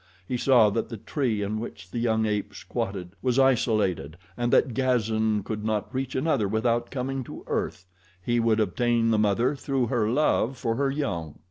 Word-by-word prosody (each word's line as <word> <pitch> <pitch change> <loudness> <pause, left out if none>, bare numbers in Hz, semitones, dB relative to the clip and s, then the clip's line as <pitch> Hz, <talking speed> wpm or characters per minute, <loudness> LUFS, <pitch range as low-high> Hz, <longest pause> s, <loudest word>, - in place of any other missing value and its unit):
He 125 - -2
saw 120 -4 +5
that 115 - -2
the 115 - -6
tree 110 0 -1
in 105 +2 -2
which 100 -5 -8
the 120 - -3
young 110 -2 +1
ape 105 -1 -2
squatted 95 -3 -4
was 125 -1 +1
isolated 110 - +2 0.2
and 120 +2 -1
that 125 - +3
Gazan 110 -4 +1
could 105 0 -4
not 110 +3 -2
reach 130 0 -3
another 130 -7 +1
without 115 +3 0
coming 135 0 -3
to - - -9
earth. 95 - -3 0.3
He 120 +6 0
would 115 -1 +2
obtain 115 +3 +2
the 110 - +3
mother 115 +6 +2
through 135 -2 -1
her 110 -3 +2
love 130 -1 +1
for 115 -2 -1
her 140 +2 +1
young. 85 - -3
115 Hz, 180 wpm, -26 LUFS, 105-125 Hz, 0.3 s, saw